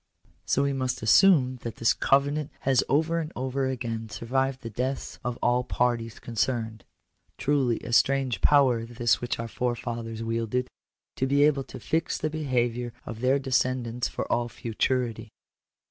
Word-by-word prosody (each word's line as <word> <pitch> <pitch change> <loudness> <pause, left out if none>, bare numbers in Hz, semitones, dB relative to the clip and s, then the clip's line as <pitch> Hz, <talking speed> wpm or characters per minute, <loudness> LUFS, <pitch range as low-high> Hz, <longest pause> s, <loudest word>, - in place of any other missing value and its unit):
So 140 - +2
we 140 0 +1
must 130 -4 -2
assume 130 - +5
that 115 -2 -6
this 115 - +3
covenant 140 +2 +1
has 135 -2 +3
over 160 +4 +2
and 160 -1 -4
over 130 +1 -1
again 115 -3 -4
survived 130 +5 -1
the 115 - -5
deaths 130 +5 -3
of 125 -1 -3
all 125 +1 +3
parties 120 -2 -1
concerned! 115 -2 -2 0.5
Truly 135 -5 +1
a 120 - -6
strange 130 -5 +2
power 130 -5 +4
this 120 0 0
which 120 - -2
our 115 - -4
forefathers 115 -2 -3
wielded 115 +2 -1 0.2
— - - -65
to 130 - +1
be 140 +2 +3
able 140 -3 +3
to 130 - -10
fix 160 +7 -1
the 155 - -2
behaviour 120 -5 -1
of 115 -1 -7
their 130 +2 +3
descendants 130 -3 0
for - - -4
all 120 0 +1
futurity! 120 0 -2
125 Hz, 160 wpm, -27 LUFS, 115-135 Hz, 0.5 s, assume